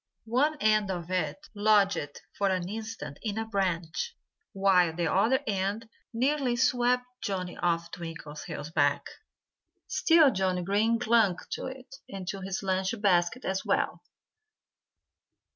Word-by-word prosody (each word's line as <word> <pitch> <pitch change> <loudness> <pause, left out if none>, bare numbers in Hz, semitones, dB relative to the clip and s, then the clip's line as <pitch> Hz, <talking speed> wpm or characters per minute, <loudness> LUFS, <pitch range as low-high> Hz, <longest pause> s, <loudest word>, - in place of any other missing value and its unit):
One 275 +7 +1
end 215 -4 +3
of 175 -2 -4
it 180 -4 -1 0.2
lodged 205 -8 +2
for 200 -1 +1
an 185 -2 -1
instant 220 -7 -6
in 215 -2 -3
a 225 - -1
branch, 190 - -2 0.3
while 185 -4 +3
the 170 -1 0
other 225 +8 +3
end 205 +2 -2 0.2
nearly 260 +1 +1
swept 245 +1 +2 0.2
Johnnie 185 -4 -3
off 170 -1 0
Twinkleheels' 160 -2 -7
back. 145 -3 +2 0.8
Still 325 -4 +5
Johnnie 185 -3 0
Green 210 +5 +2
clung 225 -6 +3
to - - -3
it 265 0 -10
and 190 -2 -7
to 195 - -4
his 190 +1 -4
lunch 190 +3 -1
basket 195 +4 +2
as 190 0 -1
well. - - 0
195 Hz, 130 wpm, -28 LUFS, 180-230 Hz, 0.8 s, Still